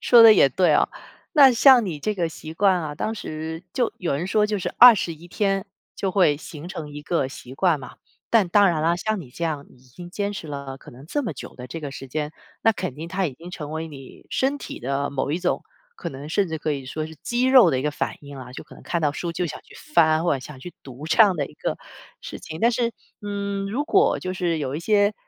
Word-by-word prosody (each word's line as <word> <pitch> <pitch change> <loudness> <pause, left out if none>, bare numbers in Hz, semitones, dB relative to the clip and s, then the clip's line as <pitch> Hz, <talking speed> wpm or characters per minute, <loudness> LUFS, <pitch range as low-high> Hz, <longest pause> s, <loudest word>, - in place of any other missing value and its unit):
说 235 -2 +7
得 220 -1 +10
也 135 - +5
对 175 +1 +3
哦， - - +3 0.4
那 280 -5 +8
像 245 -2 +6
你 160 -5 -4
这 215 +8 -2
个 175 -4 -1
习 160 0 -9
惯 190 +2 +3
啊， 155 -3 -4
当 220 - -3
时 160 -3 -6
就 245 -3 0
有 175 -6 -2
人 155 +6 -2
说 210 +2 +2
就 210 -1 -1
是 - - -3
21 175 -9 +6
天 195 +1 0 0.3
就 195 - -1
会 180 -7 +3
形 155 +2 -9
成 160 -6 -7
一 145 - -7
个 150 -2 0
习 130 -1 -10
惯 165 -2 +2
嘛， 130 - -11 0.3
但 220 -5 +4
当 200 +2 +5
然 155 -3 0
啦， 170 +1 +3
像 215 +3 -2
你 135 -8 -10
这 170 - -4
样 150 -3 -2
已 - - -20
经 175 +8 -12
坚 200 +2 -2
持 190 -5 -7
了 140 -2 -6
可 - - -14
能 130 +5 -14
这 290 - -1
么 200 - -3
久 130 - -10
的 125 - -8
这 165 +6 -7
个 145 - -5
时 135 0 -8
间， 150 +3 -4 0.3
那 225 - +4
肯 135 - -4
定 160 +3 -7
它 190 +1 -1
已 145 - -1
经 170 +7 -11
成 155 -5 -7
为 160 +1 -4
你 135 -3 -13
身 275 +2 0
体 - - -8
的 140 +3 -2
某 140 0 -2
一 165 - 0
种 180 0 -1 0.3
可 - - -5
能 140 +2 -8
甚 190 +3 +1
至 160 -1 -4
可 155 - -2
以 140 -2 -3
说 155 +4 -4
是 160 - -11
肌 240 +1 0
肉 260 -2 +7
的 130 - 0
一 130 - -2
个 150 - 0
反 145 - -3
应 140 -1 -11
啊， 125 -1 -9
就 - - -8
可 - - -16
能 - - -15
看 170 - -1
到 150 -2 +2
书 170 +3 -4
就 175 +1 -2
想 - - -6
去 - - -18 0.2
翻， 160 0 +5
或 170 - +2
者 - - -3
想 130 0 -11
去 175 - -9
读 135 +3 -9
这 165 +7 +6
样 195 -4 +4
的 145 -4 -2
一 - - -16
个 - - -3 0.4
事 - - -8
情。 160 0 -8
但 235 +1 +4
是， 235 0 0 0.3
嗯， 200 -1 -3
如 280 +7 -1
果 395 +3 +3
就 185 0 -4
是 175 -3 -1
有 140 -1 -3
一 160 - -4
些， 205 +2 +2
165 Hz, 280 characters per minute, -23 LUFS, 145-200 Hz, 0.4 s, 得